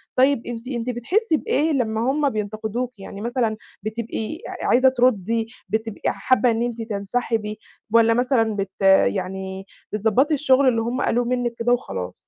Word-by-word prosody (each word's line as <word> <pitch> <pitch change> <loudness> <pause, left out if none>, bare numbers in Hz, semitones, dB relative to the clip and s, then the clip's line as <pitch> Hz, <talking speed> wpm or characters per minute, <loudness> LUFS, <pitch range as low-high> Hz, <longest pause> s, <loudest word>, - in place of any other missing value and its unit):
طيب 265 -1 +3
أنتِ 235 0 -6
أنتِ 245 -2 -3
بتحسّي 315 - +1
بإيه 310 +3 0
لمّا 225 -6 0
هُم 290 0 +1
بينتقدوكِ؟ 220 +2 -3
يعني 200 +1 -8
مثلًا 235 -1 -1 0.3
بتبقي 225 +5 -4
ع - - -5
عايزة 260 +2 +5
ترُدّي؟ 230 -3 +1 0.2
بتبقي 220 -1 -3
حابة 255 -2 +2
إن 225 - -1
أنتِ 240 -1 -3
تنسحبي؟ 215 0 -2 0.3
والّا 230 0 +6
مثلًا 235 -3 +2
بت 195 -1 -2 0.4
يعني 190 0 -3 0.3
بتضبّطي 220 +8 +2
الشغل 275 -1 +3
اللي 230 -3 +3
هُم 240 +4 -2
قالوه 245 +1 +1
منِك 245 -1 -1
كده 240 +1 +2
وخلاص؟ 95 - -3
230 Hz, 150 wpm, -22 LUFS, 215-255 Hz, 0.4 s, والّا